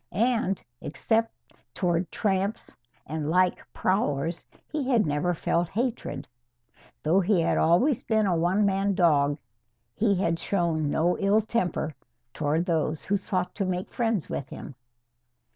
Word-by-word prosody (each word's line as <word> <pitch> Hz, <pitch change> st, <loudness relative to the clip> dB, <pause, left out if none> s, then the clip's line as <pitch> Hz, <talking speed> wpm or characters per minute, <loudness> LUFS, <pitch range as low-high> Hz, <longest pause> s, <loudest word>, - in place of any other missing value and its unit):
And, 225 Hz, -2 st, +1 dB, 0.2 s
except 225 Hz, +9 st, 0 dB, 0.4 s
toward 175 Hz, -1 st, 0 dB
tramps 195 Hz, +1 st, -1 dB, 0.3 s
and 155 Hz, 0 st, -3 dB
like 180 Hz, +2 st, +3 dB
prowlers, 165 Hz, -4 st, -1 dB, 0.2 s
he 290 Hz, -4 st, -2 dB
had 235 Hz, -5 st, +4 dB
never 150 Hz, +4 st, 0 dB
felt 170 Hz, +1 st, 0 dB
hatred. 220 Hz, -, -3 dB, 0.8 s
Though 165 Hz, +5 st, +4 dB
he 195 Hz, 0 st, +2 dB
had -, -, +1 dB
always 220 Hz, -, +3 dB
been 220 Hz, -2 st, +1 dB
a 185 Hz, -3 st, +2 dB
one 180 Hz, +5 st, +2 dB
man 195 Hz, 0 st, +1 dB
dog, 145 Hz, -6 st, +3 dB, 0.6 s
he 205 Hz, -2 st, +2 dB
had 170 Hz, -3 st, 0 dB
shown 165 Hz, -6 st, 0 dB
no 170 Hz, +4 st, +1 dB
ill 200 Hz, +2 st, +4 dB
temper 185 Hz, -8 st, -1 dB, 0.4 s
toward 155 Hz, +3 st, 0 dB
those 160 Hz, -3 st, 0 dB
who 200 Hz, -, 0 dB
sought 185 Hz, -2 st, -2 dB
to 205 Hz, -, -2 dB
make 185 Hz, -1 st, -3 dB
friends 225 Hz, -7 st, 0 dB
with 135 Hz, -, -4 dB
him. -, -, -8 dB
180 Hz, 140 wpm, -27 LUFS, 160-205 Hz, 0.8 s, had